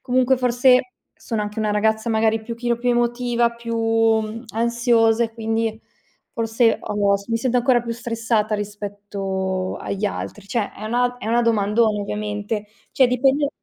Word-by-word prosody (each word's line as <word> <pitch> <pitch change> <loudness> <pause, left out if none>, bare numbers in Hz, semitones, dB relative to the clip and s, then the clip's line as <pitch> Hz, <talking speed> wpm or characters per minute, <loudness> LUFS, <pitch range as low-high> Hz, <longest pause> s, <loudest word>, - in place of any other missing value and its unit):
comunque, 255 +1 +2
forse, 250 0 +3 0.2
sono 220 -2 -4
anche 210 +1 -5
una 215 -1 0
ragazza, 220 +2 +1
magari, 220 0 +2
un 220 - -15
pochino 235 +1 -2
più 245 +1 0
emotiva, 240 0 +1
più, 235 0 -6
mhmm, 225 0 +1
ansiosa 235 0 +2
e 225 - -7
quindi 225 -1 -2 0.5
forse 225 0 +1
ho 205 -1 +1
s 200 0 -12
mi 230 - 0
sento 250 +2 0
ancora 245 0 +3
più 235 -1 -4
stressata 230 -2 -1
rispetto 200 -2 -4
agli 200 +1 -3
altri. 205 0 -4
Cioè, 215 -1 -2
è 215 - -9
una 245 +2 0
è - - -7
una 235 +2 +2
domandona 215 -1 +2
ovviamente. 210 +1 -3 0.3
Cioè, 260 -2 +4
dipende 270 +3 +2
225 Hz, 160 wpm, -21 LUFS, 210-240 Hz, 0.5 s, Cioè